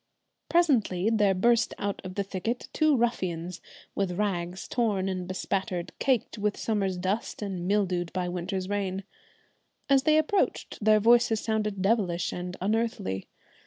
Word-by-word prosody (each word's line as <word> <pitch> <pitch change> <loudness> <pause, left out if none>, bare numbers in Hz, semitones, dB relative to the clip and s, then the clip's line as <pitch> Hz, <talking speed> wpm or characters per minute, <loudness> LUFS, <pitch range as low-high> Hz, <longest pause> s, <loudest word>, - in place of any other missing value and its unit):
Presently 225 - +3
there 205 -3 +3
burst 235 +4 +3
out 200 0 -3
of 185 -1 -7
the 200 - 0
thicket 200 +5 -4
two 310 -3 +3
ruffians, 180 -7 -1 0.3
with 195 -3 -1
rags 180 -3 -2
torn 210 -6 0
and 185 -2 -3
bespattered, 185 -1 -2
caked 250 -4 0
with 205 0 0
summer's 195 -4 -1
dust 195 +4 -2
and 185 -3 -4
mildewed 185 -4 +1
by 180 -1 -2
winter's 185 +1 -3
rain. 195 -1 -2 0.9
As 270 -1 +6
they 310 +2 +4
approached 315 - 0
their 215 0 +5
voices 230 0 +4
sounded 210 -3 -1
devilish 195 -5 +1
and 180 +1 -5
unearthly. 215 - -1
200 Hz, 140 wpm, -28 LUFS, 185-225 Hz, 0.9 s, As